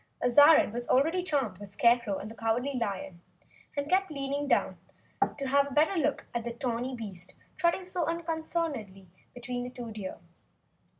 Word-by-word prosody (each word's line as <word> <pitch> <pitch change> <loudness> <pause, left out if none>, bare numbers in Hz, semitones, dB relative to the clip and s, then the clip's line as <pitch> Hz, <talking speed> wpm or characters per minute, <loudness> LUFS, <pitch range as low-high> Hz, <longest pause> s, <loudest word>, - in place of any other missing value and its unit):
Azarine 290 0 +6
already 320 +8 +3
was 360 - -4
charmed 250 - 0
with 205 -1 -9
the - - -16
Scarecrow 235 -4 +3
and 215 - -7
the - - -8
Cowardly 230 +5 -1
Lion, 195 -7 -3 0.6
and 285 0 -1
kept 380 +3 +2
leaning 280 0 -3
down - - +1 0.6
to 280 - -4
have 280 +1 +3
a 280 - -7
better 315 +6 +4
look 300 -4 0
at 235 -1 -2
the 240 - -3
tawny 245 +1 -2
beast 190 -6 -7 0.2
trotting 345 +2 +1
so 360 -2 -2
unconcernedly 320 - -3 0.3
between 245 0 -4
the 250 - -5
two 245 -3 -8
deer. 205 -3 -6
255 Hz, 170 wpm, -29 LUFS, 225-305 Hz, 0.6 s, Azarine